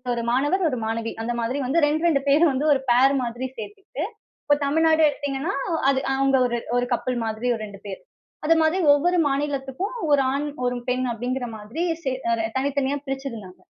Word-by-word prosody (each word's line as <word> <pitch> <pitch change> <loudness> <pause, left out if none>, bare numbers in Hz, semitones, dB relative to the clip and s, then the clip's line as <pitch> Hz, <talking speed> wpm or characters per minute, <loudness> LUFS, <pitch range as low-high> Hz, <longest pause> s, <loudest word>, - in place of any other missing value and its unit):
ஒரு 235 - -3
மாணவர், 290 +9 +1
ஒரு 255 - -3
மாணவி 225 +1 -2
அந்த 240 +1 -2
மாதிரி 250 +5 -1
வந்து 285 +7 +2
2, 310 +3 0
2 280 -5 +2
பேர் 300 +5 +5
வந்து 275 +3 -1
ஒரு 275 - +1
ஃபேர் 255 +3 +5
மாதிரி 240 +2 -4
சேர்த்துக்கிட்டு, 405 -2 -7 0.4
இப்ப 290 - +4
தமிழ்நாடு 320 +2 +3
எடுத்தீங்கன்னா 285 +5 -2 0.4
அது 270 -1 +2
அவுங்க 270 0 +3 0.4
ஒரு 245 0 +2
கப்பிள் 250 +1 -1
மாதிரி 220 +2 -3
ஒரு 225 - -5
2 200 -1 -11
பேர். 195 -2 -5 0.5
அது 330 - +5
மாதிரி 315 +3 +2 0.2
ஒவ்வொரு 350 +5 +2
மாநிலத்துக்கும் 280 - -2 0.2
ஒரு 285 -1 +5
ஆண், 285 +2 -1 0.2
ஒரு 245 - 0
பெண் 255 +1 0
அப்பிடிங்கிற 245 +2 -3
மாதிரி 215 +10 -6 0.2
சே 265 - 0 0.5
தனித்தனியா 280 +1 0
பிரிச்சிருந்தாங்க. 230 -9 -6
270 Hz, 170 wpm, -24 LUFS, 245-290 Hz, 0.5 s, பேர்